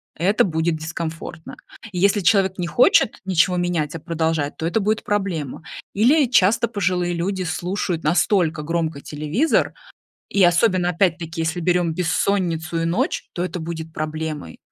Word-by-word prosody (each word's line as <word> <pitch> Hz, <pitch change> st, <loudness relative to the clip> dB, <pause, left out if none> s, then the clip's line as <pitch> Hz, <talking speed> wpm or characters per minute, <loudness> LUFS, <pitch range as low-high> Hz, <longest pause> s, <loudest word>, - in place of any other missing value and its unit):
это 195 Hz, +6 st, +2 dB
будет 160 Hz, -2 st, 0 dB
дискомфортно. 160 Hz, 0 st, -6 dB, 0.4 s
Если 200 Hz, +2 st, +2 dB
человек 190 Hz, 0 st, +3 dB
не 175 Hz, -2 st, -2 dB
хочет 240 Hz, +2 st, +4 dB
ничего 180 Hz, -1 st, +2 dB
менять, 170 Hz, -4 st, -1 dB
а 165 Hz, -, -4 dB
продолжает, 160 Hz, -2 st, -1 dB
то 160 Hz, -, -4 dB
это 175 Hz, +7 st, +1 dB
будет 215 Hz, +1 st, 0 dB
проблема. 180 Hz, -9 st, -2 dB, 0.3 s
Или 270 Hz, +9 st, +4 dB
часто 230 Hz, 0 st, +4 dB
пожилые 180 Hz, -4 st, 0 dB
люди 185 Hz, +2 st, -2 dB
слушают 175 Hz, 0 st, -2 dB
настолько 165 Hz, -1 st, +2 dB
громко 160 Hz, -2 st, -2 dB
телевизор, 155 Hz, -, 0 dB, 0.6 s
и 200 Hz, -, +2 dB
особенно, 180 Hz, +1 st, +3 dB
опять-таки, 170 Hz, -2 st, 0 dB
если 160 Hz, +2 st, -2 dB
берем 175 Hz, -1 st, +1 dB
бессонницу 165 Hz, -1 st, 0 dB
и -, -, 0 dB
ночь, 170 Hz, -, -1 dB
то 175 Hz, -, -2 dB
это 180 Hz, -1 st, -4 dB
будет 160 Hz, -1 st, -6 dB
проблемой. 155 Hz, -, -5 dB
175 Hz, 145 wpm, -21 LUFS, 160-190 Hz, 0.6 s, хочет